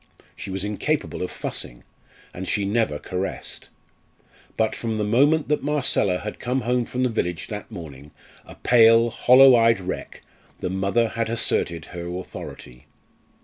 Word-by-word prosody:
She - - -8
was 95 0 -3
incapable 105 +9 -2
of 90 - -2
fussing, - - -4 0.5
and 95 +1 -6
she 100 -2 0
never 105 -7 0
caressed. 95 +4 -5 0.9
But 110 -1 +1
from 115 -2 -3
the 105 - -1
moment 145 +9 +3
that 150 - +1
Marcella 140 -10 +1
had 105 +3 -7
come 125 +2 -1
home 125 0 0
from 125 +1 -2
the 125 - +2
village 90 -7 -2
that 105 -1 -6
morning, 75 - -10 0.3
a - - -13
pale, 115 -1 +5
hollow 130 +3 +7
eyed 115 -2 +4
wreck, 95 0 -6 0.4
the 90 - -3
mother 100 +5 +1
had 115 0 -2
asserted 85 -8 0
her 85 -1 -6
authority. 60 -8 -10
110 Hz, 150 wpm, -23 LUFS, 95-120 Hz, 0.9 s, hollow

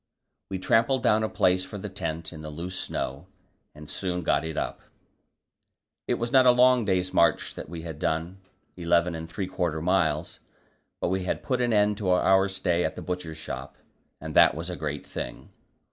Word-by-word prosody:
We 95 - -2
trampled 115 +7 +2
down 105 +1 +4
a 110 - 0
place 90 0 +2
for 105 - -8
the 105 - -5
tent 85 -4 -4
in 80 - -9
the 75 - -7
loose 85 +5 -6
snow, 70 -2 -4 0.5
and 75 0 -11
soon 90 0 -3
got - - +2
it 80 -1 -5
up. - - -3 1.3
It - - +2
was 120 0 -3
not 130 -1 +6
a - - +9
long 125 -1 +5
day's 95 -2 0
march 85 - +3
that - - -8
we 85 -1 -7
had 80 -3 -7
done 80 +5 -2 0.4
eleven 85 0 +2
and 80 0 -6
three 95 +3 -3
quarter 85 -4 -2
miles 80 -2 0 0.6
but - - 0
we 95 0 -1
had - - -2
put 125 -2 0
an 120 -1 +1
end 105 -1 +3
to 100 -3 -2
our 95 +1 +4
stay 90 -2 0
at - - -2
the - - -7
Butcher's 90 -3 -4
Shop, 80 - -7 0.4
and - - -6
that - - +7
was 85 +3 -4
a - - -4
great 75 -3 -4
thing. - - -6
90 Hz, 195 wpm, -27 LUFS, 80-100 Hz, 1.3 s, a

